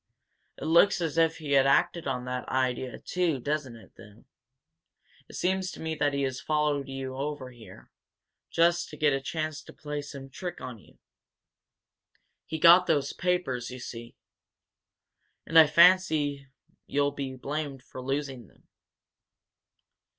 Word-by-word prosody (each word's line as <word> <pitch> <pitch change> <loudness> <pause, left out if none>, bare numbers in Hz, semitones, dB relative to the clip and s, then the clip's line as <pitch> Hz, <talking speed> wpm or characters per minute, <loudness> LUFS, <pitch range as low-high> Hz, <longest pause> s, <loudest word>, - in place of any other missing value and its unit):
"It - - -7
looks 170 +6 +4
as 165 -1 -1
if 165 -1 +3
he 150 -3 -6
had 135 -1 +5
acted 165 +3 +2
on 125 -2 -2
that 125 0 -4
idea, 130 -1 -1
too, 175 -6 -1
doesn't 145 -2 -3
it, 115 - -16
then? 105 -1 -16 1.0
It - - -11
seems 190 +1 0
to - - -11
me 160 0 -3
that 145 -2 0
he 140 - 0
has 130 -1 -3
followed 150 -2 0
you 135 -1 -5 0.3
down 130 -1 -9
here, 120 -2 -15 0.6
just 170 +1 +2
to 150 - -10
get 150 -1 +3
a 135 - -1
chance 155 +1 -4
to - - -13
play 150 -1 -5
some 140 -2 -10
trick 175 +4 -6
on 125 -3 -8
you. - - -21 1.5
He 160 - -3
got 170 +3 +7
those 145 -3 +1
papers, 175 -10 -1
you 125 - -8
see. 115 -1 -9 1.3
And 165 - +5
I 160 - +8
fancy 155 -4 +4 0.4
you'll 145 0 +1
be 135 -2 -5
blamed 140 0 -5
for 130 - -10
losing 135 -3 -4
them." - - -27
145 Hz, 150 wpm, -28 LUFS, 130-160 Hz, 1.5 s, I